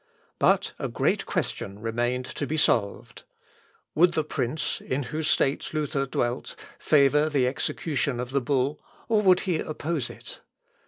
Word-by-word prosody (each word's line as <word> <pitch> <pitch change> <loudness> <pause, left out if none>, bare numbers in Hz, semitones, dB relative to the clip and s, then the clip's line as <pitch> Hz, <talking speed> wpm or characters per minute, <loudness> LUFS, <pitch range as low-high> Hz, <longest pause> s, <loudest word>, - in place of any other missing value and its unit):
But - - +3
a - - -2
great - - 0
question 100 0 -3
remained 120 +3 -1
to 145 - -4
be 155 - -2
solved. 115 -3 0 0.7
Would 170 +2 +4
the 155 - +1
prince, 150 0 -2
in 135 +2 -2
whose 155 +5 -3
states 140 +3 +1
Luther 145 -2 -1
dwelt, 120 0 -2 0.2
favour 150 +1 +4
the 140 -4 +2
execution 140 0 -1
of 125 0 -4
the 140 0 +1
bull, 140 +3 0 0.3
or 220 -2 +3
would 185 -3 +5
he 175 -4 0
oppose 155 -3 -3
it? - - -11
140 Hz, 150 wpm, -26 LUFS, 125-155 Hz, 0.7 s, would